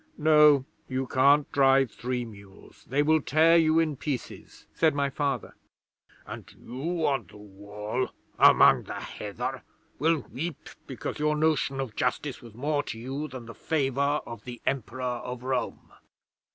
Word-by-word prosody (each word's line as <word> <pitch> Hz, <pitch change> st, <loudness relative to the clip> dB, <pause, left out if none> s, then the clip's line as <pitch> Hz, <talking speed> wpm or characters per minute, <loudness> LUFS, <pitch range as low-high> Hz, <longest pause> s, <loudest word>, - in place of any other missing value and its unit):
'"No; 150 Hz, -3 st, +5 dB, 0.2 s
you 130 Hz, 0 st, -2 dB
can't 140 Hz, +3 st, +3 dB
drive 135 Hz, -3 st, +4 dB
three 125 Hz, 0 st, -3 dB
mules. 100 Hz, -3 st, -15 dB
They 140 Hz, +3 st, +1 dB
will 155 Hz, +1 st, +3 dB
tear 160 Hz, +4 st, +4 dB
you 160 Hz, -1 st, +4 dB
in 155 Hz, -4 st, +1 dB
pieces," 135 Hz, -3 st, -6 dB
said 160 Hz, -2 st, +2 dB
my 140 Hz, -1 st, 0 dB
Father. 140 Hz, -4 st, -2 dB, 0.7 s
'"And -, -, -9 dB
you 160 Hz, +7 st, -3 dB
on 135 Hz, -1 st, 0 dB
the -, -, -15 dB
Wall, 105 Hz, +4 st, -5 dB, 0.3 s
among -, -, +6 dB
the -, -, -6 dB
heather, -, -, -5 dB, 0.4 s
will 160 Hz, +3 st, +3 dB
weep 165 Hz, +4 st, -5 dB, 0.2 s
because -, -, -5 dB
your 150 Hz, 0 st, +1 dB
notion 150 Hz, -3 st, +1 dB
of 130 Hz, -5 st, -4 dB
justice 130 Hz, +2 st, -2 dB
was 115 Hz, -3 st, -13 dB
more 145 Hz, +4 st, 0 dB
to 115 Hz, -, -7 dB
you 135 Hz, +6 st, -5 dB
than 130 Hz, -5 st, -9 dB
the 115 Hz, -, -9 dB
favour 140 Hz, 0 st, 0 dB
of 115 Hz, -3 st, -9 dB
the 125 Hz, -1 st, -8 dB
Emperor 130 Hz, -1 st, -2 dB
of 125 Hz, 0 st, -4 dB
Rome." 130 Hz, -1 st, -3 dB
135 Hz, 150 wpm, -27 LUFS, 125-150 Hz, 0.7 s, among